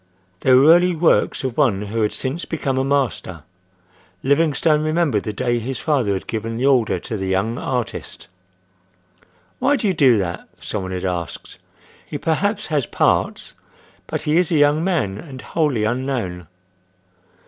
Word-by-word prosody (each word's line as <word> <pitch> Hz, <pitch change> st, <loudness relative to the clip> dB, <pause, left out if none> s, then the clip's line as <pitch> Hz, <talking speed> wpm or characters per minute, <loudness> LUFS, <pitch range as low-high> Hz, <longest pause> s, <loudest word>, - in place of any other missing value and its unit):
They 130 Hz, -, +2 dB
were 135 Hz, +5 st, +7 dB
early 175 Hz, 0 st, +3 dB
works 165 Hz, -3 st, +2 dB
of 130 Hz, -3 st, -3 dB
one 115 Hz, -10 st, +2 dB
who 110 Hz, +2 st, -3 dB
had 105 Hz, -, +1 dB
since 140 Hz, +6 st, -3 dB
become 135 Hz, -5 st, -2 dB
a -, -, +1 dB
master. 130 Hz, -, -1 dB, 0.8 s
Livingstone 150 Hz, +2 st, +2 dB
remembered 155 Hz, -8 st, +1 dB
the 105 Hz, -, -4 dB
day 120 Hz, +3 st, -1 dB
his 125 Hz, +3 st, -4 dB
father 130 Hz, -10 st, +1 dB
had 95 Hz, -, -4 dB
given 115 Hz, +1 st, -4 dB
the 125 Hz, -, 0 dB
order 125 Hz, -8 st, +3 dB
to 110 Hz, -, -5 dB
the 95 Hz, -1 st, -3 dB
young 100 Hz, +5 st, 0 dB
artist. 125 Hz, -3 st, -4 dB, 1.3 s
"Why 275 Hz, +3 st, +3 dB
do 220 Hz, -5 st, -1 dB
you 190 Hz, -, +2 dB
do 135 Hz, -8 st, +4 dB
that?" 90 Hz, -3 st, -4 dB
some 105 Hz, -, -4 dB
one 95 Hz, 0 st, -5 dB
had 90 Hz, 0 st, -3 dB
asked. 90 Hz, -3 st, -5 dB, 0.4 s
"He -, -, -6 dB
perhaps 200 Hz, +6 st, -1 dB
has 145 Hz, -6 st, -1 dB
parts, -, -, 0 dB, 0.5 s
but -, -, -3 dB
he 150 Hz, +2 st, +2 dB
is 180 Hz, -1 st, +2 dB
a -, -, +2 dB
young 145 Hz, +2 st, +3 dB
man 135 Hz, -, -1 dB
and 135 Hz, -2 st, -10 dB
wholly 145 Hz, -7 st, 0 dB
unknown." 115 Hz, -7 st, -2 dB
130 Hz, 165 wpm, -20 LUFS, 105-155 Hz, 1.3 s, were